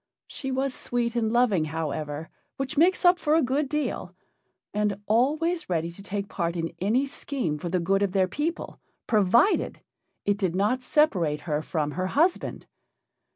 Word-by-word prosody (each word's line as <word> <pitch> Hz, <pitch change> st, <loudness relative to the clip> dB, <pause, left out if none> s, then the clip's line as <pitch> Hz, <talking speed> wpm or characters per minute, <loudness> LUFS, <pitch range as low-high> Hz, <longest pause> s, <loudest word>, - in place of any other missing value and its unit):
She 270 Hz, -, -6 dB
was 265 Hz, 0 st, 0 dB
sweet 240 Hz, -1 st, -2 dB
and 225 Hz, -2 st, +1 dB
loving, 230 Hz, -9 st, +3 dB
however, 155 Hz, 0 st, -4 dB, 0.3 s
which 270 Hz, +2 st, -3 dB
makes 360 Hz, +5 st, +3 dB
up 355 Hz, 0 st, +6 dB
for 300 Hz, 0 st, +2 dB
a 325 Hz, -, +4 dB
good 270 Hz, +3 st, 0 dB
deal, 300 Hz, 0 st, -2 dB, 0.6 s
and 205 Hz, -1 st, 0 dB
always 300 Hz, -, +1 dB
ready 170 Hz, -1 st, -1 dB
to 175 Hz, -, -11 dB
take 200 Hz, 0 st, -4 dB
part 170 Hz, -3 st, -2 dB
in 165 Hz, 0 st, -3 dB
any 225 Hz, +9 st, +2 dB
scheme 265 Hz, -, -3 dB
for 175 Hz, -, -4 dB
the 180 Hz, +1 st, +1 dB
good 195 Hz, +3 st, +1 dB
of 200 Hz, -2 st, +1 dB
their 190 Hz, -1 st, +2 dB
people, 305 Hz, -, -3 dB, 0.3 s
provided 220 Hz, -, +3 dB, 0.4 s
it 205 Hz, 0 st, +1 dB
did 185 Hz, -4 st, 0 dB
not 210 Hz, +7 st, +1 dB
separate 185 Hz, -, +2 dB
her 150 Hz, -2 st, -1 dB
from 155 Hz, -2 st, -2 dB
her 185 Hz, +4 st, -2 dB
husband. 330 Hz, -, +1 dB
210 Hz, 165 wpm, -26 LUFS, 170-275 Hz, 0.6 s, up